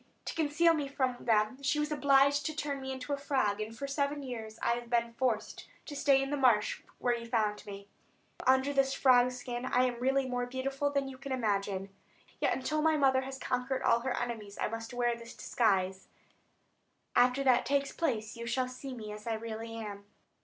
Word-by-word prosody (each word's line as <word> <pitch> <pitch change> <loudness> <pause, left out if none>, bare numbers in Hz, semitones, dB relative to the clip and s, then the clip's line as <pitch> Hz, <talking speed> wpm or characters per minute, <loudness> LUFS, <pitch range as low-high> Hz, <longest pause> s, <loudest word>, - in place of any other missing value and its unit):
To - - -3
conceal 325 +2 +3
me 295 -3 -1
from 260 -3 -2
them 225 +3 +2
she 280 +2 +1
was 300 0 -1
obliged 280 0 +4
to 310 - -4
turn 285 -3 -3
me 265 0 -4
into 260 +2 -4
a - - 0
frog; 260 -7 0
and 220 +1 -6
for 280 - -4
seven 280 +1 -1
years 225 -4 -6
I - - +2
have 240 0 -3
been 235 -1 +1
forced 230 -3 -2 0.2
to 290 - -7
stay 275 -1 +4
in 270 - -4
the 290 - 0
marsh 240 -6 +3 0.2
where 245 -1 +1
you 235 0 -7
found 215 -3 0
me. 200 0 -8 0.5
But - - -7
under 265 +2 +4
this 270 -1 +2
frog 250 -1 +5
skin 245 -1 -5
I 255 -1 +2
am 245 -2 -2
really 265 +1 +1
more 245 -1 -2
beautiful 270 +3 -1
than 280 -1 0
you 260 -1 -9
can 275 +1 -7
imagine; 200 -5 -1 0.5
yet - - +2
until 305 +4 -1
my 315 0 +3
mother 265 -2 +4
has 265 0 -6
conquered 255 +1 -2
all 230 - +4
her 255 +2 -2
enemies 220 -4 -4
I - - 0
must 225 +1 -6
wear 240 -1 +1
this 235 0 -11
disguise; 190 -4 0 1.1
after 250 +2 +4
that 255 -3 +4
takes 280 0 +1
place 230 -9 -1
you 235 0 -6
shall 255 +1 0
see 255 +1 -7
me 215 -3 -7
as 210 +1 -9
I 225 - 0
really 225 0 -6
am." 205 -3 -7
255 Hz, 210 wpm, -31 LUFS, 230-275 Hz, 1.1 s, frog